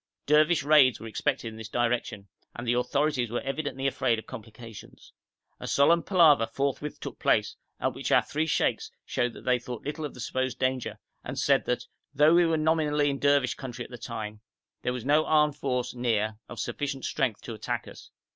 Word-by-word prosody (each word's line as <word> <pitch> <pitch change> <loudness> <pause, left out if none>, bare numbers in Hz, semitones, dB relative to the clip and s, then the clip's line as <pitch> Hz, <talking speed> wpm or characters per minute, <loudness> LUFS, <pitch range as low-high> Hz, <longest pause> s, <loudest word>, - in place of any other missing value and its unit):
Dervish 155 +2 +4
raids 145 -4 +5
were - - -9
expected 120 +2 -2
in 110 - -11
this 110 -1 -8
direction, 120 -4 -1 0.3
and 120 - -6
the 120 - +2
authorities 130 0 0
were 120 - -2
evidently 135 -1 -3
afraid 130 -3 +1
of 110 - -7
complications. 110 0 -11 0.5
A - - -6
solemn 170 +5 +4
palaver 160 - +5
forthwith 140 +4 -3
took - - -7
place, - - +2 0.2
at - - 0
which - - -4
our - - +5
three 155 +1 -2
sheikhs - - 0 0.2
showed 120 -1 -1
that - - -13
they 125 -1 +3
thought 125 -1 -8
little 150 +2 -4
of 145 - -5
the - - -11
supposed 130 0 -2
danger, 130 -1 -1 0.3
and - - -6
said - - +2
that, - - -1 0.3
though 150 +3 +5
we 175 0 +5
were 165 -1 +1
nominally 155 -2 +2
in 140 - -4
Dervish 140 -2 +3
country 125 -3 -7
at - - -14
the 125 - -7
time, 110 -2 -6 0.4
there 125 - -1
was 125 -1 -6
no 150 +3 +4
armed 150 -2 +3
force 125 -3 -2
near 110 -3 -1
of 120 - -8
sufficient 140 +2 -3
strength 115 -5 -1
to 115 - -6
attack 110 - -4
us. - - -12
130 Hz, 195 wpm, -27 LUFS, 120-150 Hz, 0.5 s, raids